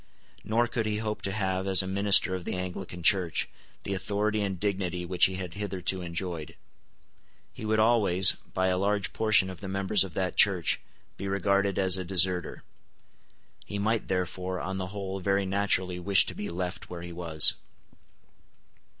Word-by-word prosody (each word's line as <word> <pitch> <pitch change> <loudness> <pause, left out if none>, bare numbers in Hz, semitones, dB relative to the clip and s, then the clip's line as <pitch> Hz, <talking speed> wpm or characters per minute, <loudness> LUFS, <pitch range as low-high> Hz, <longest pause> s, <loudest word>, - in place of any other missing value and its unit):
Nor 115 +2 +1
could 115 -2 -2
he 105 -1 -1
hope 105 -1 -4
to 100 - -1
have, 95 -2 -2
as 95 0 +7
a - - -6
minister 100 0 +3
of 90 -1 -4
the - - -4
Anglican 90 -1 -6
Church, 90 -2 +3 0.4
the 100 - -3
authority 105 +3 -1
and 95 -3 -3
dignity 95 -3 -2
which 90 0 +3
he 95 - -1
had 90 -2 -6
hitherto 95 -2 -2
enjoyed. 85 -2 -5 1.0
He - - -8
would 110 0 +1
always, 105 -5 +5
by 95 0 -3
a 90 0 0
large 100 +1 0
portion 110 -3 +3
of 95 -3 -9
the 95 - -6
members 95 +1 +2
of 95 -4 -9
that 95 -2 -2
Church, 95 -5 +3 0.4
be 100 - -5
regarded 100 0 0
as 95 -1 +1
a - - -3
deserter. 90 -1 +1 1.0
He 100 - -6
might 110 +2 -1
therefore, 90 0 -3
on 95 +1 -4
the 95 -1 -3
whole, 95 0 -5
very 100 +1 0
naturally 95 -2 0
wish 95 +2 +4
to - - -4
be 105 - -5
left 90 +1 -5
where 85 -1 -7
he 85 0 -8
was. 85 -3 +1
95 Hz, 175 wpm, -28 LUFS, 90-100 Hz, 1.0 s, as